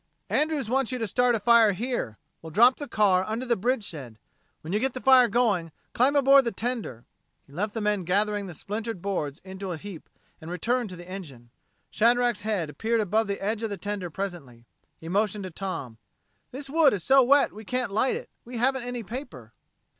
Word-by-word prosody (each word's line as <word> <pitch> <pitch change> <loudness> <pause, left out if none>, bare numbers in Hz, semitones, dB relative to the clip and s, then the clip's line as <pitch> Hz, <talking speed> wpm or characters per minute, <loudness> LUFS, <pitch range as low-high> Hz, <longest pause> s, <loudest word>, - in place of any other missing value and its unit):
"Andrews 300 -5 +1
wants 260 +1 0
you 255 - -2
to 230 - -2
start 245 +3 +2
a - - -1
fire 225 -1 +5
here. 220 - -3 0.2
We'll 160 - -9
drop 235 +9 +5
the 290 - -6
car 195 -6 +3
under 220 +5 -3
the 240 -2 +2
bridge 235 +3 0
shed. 135 - -9 0.4
When 160 +4 -6
you 210 - +2
get 265 +2 -1
the - - -3
fire 260 -2 +6
going, 205 -10 +1 0.2
climb 265 +4 +3
aboard 275 -1 +6
the 235 - 0
tender." 220 - -4 0.4
He 140 - -20
left 205 +7 -3
the 225 - -2
men 210 -2 0
gathering 205 +3 0
the 175 - -9
splintered 215 +4 -5
boards 170 -6 -3
into 190 0 -6
a 170 - -4
heap, 190 -2 -10 0.3
and 160 - -9
returned 230 +7 -1
to 185 - -8
the 175 0 -11
engine. 140 -11 -9 0.4
Shadrack's 240 0 +2
head 205 -6 -1
appeared 225 +9 -1
above 215 +1 +1
the 200 0 -3
edge 215 +2 -1
of 225 - -2
the 200 - -4
tender 200 -1 -4
presently. 155 -10 -6 0.3
He 165 - -11
motioned 205 +2 0
to 185 - -6
Tom. 155 - -6 0.5
"This 275 +2 -7
wood 300 -1 +4
is 190 -4 -3
so 270 +1 +6
wet 280 +3 +4
we 215 - -10
can't 250 +1 -2
light 255 +5 +2
it. - - -8
We 240 0 -8
haven't 265 +2 +1
any 245 -1 -5
paper." 195 - -8
210 Hz, 205 wpm, -26 LUFS, 185-245 Hz, 0.5 s, fire